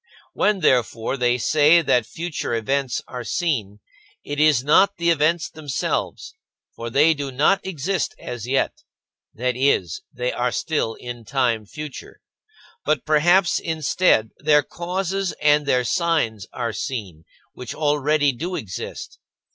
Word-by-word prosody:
When, 210 -2 +1
therefore, 120 -4 +1
they 125 -2 +1
say 155 +6 +4
that 120 -5 +2
future 165 -7 -4
events 130 +2 -1
are 125 -1 -6
seen, 115 - -2 0.4
it 145 0 -5
is 150 -5 +4
not 190 +8 +4
the 170 0 +2
events 155 0 +1
themselves, 145 - -3 0.4
for 115 0 -5
they 150 +7 +4
do 140 -2 -5
not 155 +10 +2
exist 185 -1 -2
as 120 -2 -7
yet 135 +1 0 0.5
(that 125 +2 -1
is, 125 - +1
they 125 -1 -2
are 125 0 -1
still 130 -7 -1
in 120 -1 -8
time 115 -3 0
future), 150 +4 -9 0.6
but 150 -3 0
perhaps, 175 +4 +3
instead, 160 - +1
their 150 -1 +4
causes 185 +4 -3
and 150 -1 +2
their 125 -2 +2
signs 115 - 0
are 115 -2 -3
seen, 100 - -5 0.3
which 125 - -7
already 150 -1 +2
do 170 +8 -5
exist. 445 - -7
145 Hz, 135 wpm, -22 LUFS, 120-165 Hz, 0.6 s, say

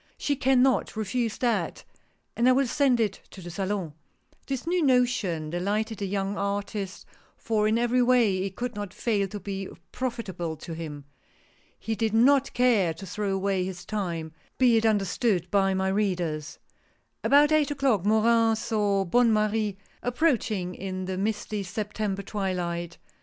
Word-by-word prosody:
" - - -36
She 285 - 0
can 260 -1 +3
not 265 -3 +1
refuse 220 +1 -1
that, 240 -2 -1 0.5
and 240 +2 +3
I - - +6
will 270 +2 +3
send 255 0 +2
it 210 -4 -1
to - - -12
the 175 -1 -8
Salon." 190 -3 -3 0.5
This 270 -1 -3
new 350 +1 +1
notion 235 - +1
delighted 210 +5 -1
the 200 - -2
young 195 +1 -2
artist, 200 -2 -3 0.3
for 215 -2 0
in 220 +1 +2
every 240 +1 +2
way 240 -6 +3
it 190 0 -3
could 245 0 -3
not 205 -3 -6
fail 205 -4 0
to 205 +2 -7
be 195 -1 -5 0.2
profitable 190 -10 -4
to 165 +2 -8
him. 150 -3 -7 0.7
He 225 - -3
did 220 0 -1
not 270 +4 +4
care 220 -10 +3
to 195 - -9
throw 200 +2 -3
away 195 -1 0
his 180 -1 -6
time, 170 -7 -3 0.3
be 250 -3 +5
it 225 0 +3
under 205 -3 +2
stood, 185 -4 0
by 195 -1 +3
my 190 0 0
readers. 180 -7 -1 0.7
About 290 +2 +5
eight 310 -2 +3
o'clock 270 -9 +1
Morin 225 +2 +3
saw 210 -3 0
Bonne 235 +6 +4
Marie 215 -1 +1 0.2
ap 245 0 -3
proaching 215 - +1
in 185 -1 -5
the 190 0 -3
misty 210 +1 -2
September 200 +1 -3
twilight. 175 -4 -3
210 Hz, 165 wpm, -27 LUFS, 190-235 Hz, 0.7 s, I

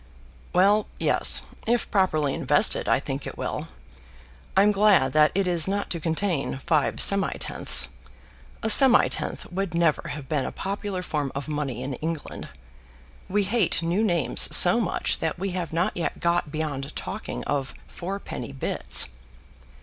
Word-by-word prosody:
"Well, 200 +4 +3
yes; - - +4 0.2
if 240 +1 0
properly 155 -8 +1
invested - - +1
I - - +3
think - - -6
it - - -9
will. - - -5 0.9
I'm 205 +2 +5
glad 195 -10 +3
that 155 0 +4
it 195 0 +1
is 175 -2 +3
not 200 +1 -3
to 170 - -2
contain 160 -3 -2
five 150 +2 0
semitenths. 200 -1 +1 0.8
A 220 - 0
semitenth 265 +2 +5
would 190 -2 -4
never 170 -3 0
have 145 -3 -7
been 145 -2 -1
a - - -5
popular 195 -1 -5
form 145 -5 -3
of 140 +2 -5
money 145 -5 -4
in 135 +1 -5
England. 160 -1 -5 0.8
We 205 +2 +1
hate 200 -4 0
new 175 +6 0
names 175 -8 +2
so - - +7
much - - -1
that - - -3
we 190 +2 -4
have 175 -2 -5
not 175 +5 -1
yet 170 - -4
got 170 -3 -1
beyond 145 -3 -5
talking - - -6
of 140 -2 -3
fourpenny 180 -9 -7
bits." 130 - +3
170 Hz, 150 wpm, -24 LUFS, 150-195 Hz, 0.9 s, so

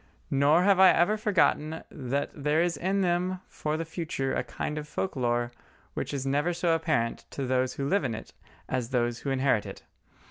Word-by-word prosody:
Nor 145 +5 +4
have 195 -1 +4
I 190 -1 +9
ever 175 +6 +4
forgotten 165 -6 +1
that 140 -1 -2
there 150 +2 0
is 170 0 +2
in 195 +3 0
them 180 +1 0
for 155 0 -3
the 165 - -3
future 165 -4 -3
a - - 0
kind 150 0 -4
of 150 - -8
folk 185 +3 -3
lore 120 -2 0 0.4
which - - -3
is 135 -2 -3
never 145 +6 +1
so 170 -1 +1
apparent 155 -8 0
to 140 - -4
those 130 0 +1
who 140 - -2
live 195 +3 +2
in 120 -4 -1
it 110 - -9 0.3
as 125 -3 -1
to - - -19
those 120 -1 +1
who 140 - -4
inherit 135 -5 +1
it. - - -9
150 Hz, 205 wpm, -28 LUFS, 130-175 Hz, 0.4 s, I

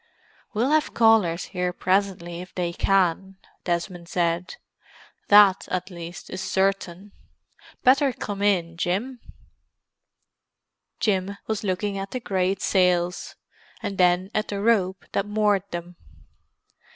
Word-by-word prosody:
"We'll 240 +6 +1
have 310 0 +1
callers 220 -7 +4
here 180 -1 -1
presently 185 -2 -1
if 180 - -12
they 175 -1 -2
can," 190 0 +1 0.3
Desmond 175 0 -3
said. 175 0 -1 0.7
"That, 205 -2 +6
at 185 +1 -3
least, 170 -1 -9
is 185 - -5
certain. 195 0 -1 0.7
Better 270 +2 +4
come 205 -4 -6
in, 175 -5 +1
Jim." 205 +10 -2 1.8
Jim 200 -1 0
was 220 -1 -3
looking 195 +1 -2
at 195 0 -5
the 255 - -4
great 190 -3 -1
sails, 180 -2 +1 0.5
and 195 - -4
then 180 +2 +3
at 215 - -1
the 200 - -4
rope 200 -4 +1
that 200 - -1
moored 205 -2 +1
them. 175 0 -7
190 Hz, 120 wpm, -24 LUFS, 180-205 Hz, 1.8 s, That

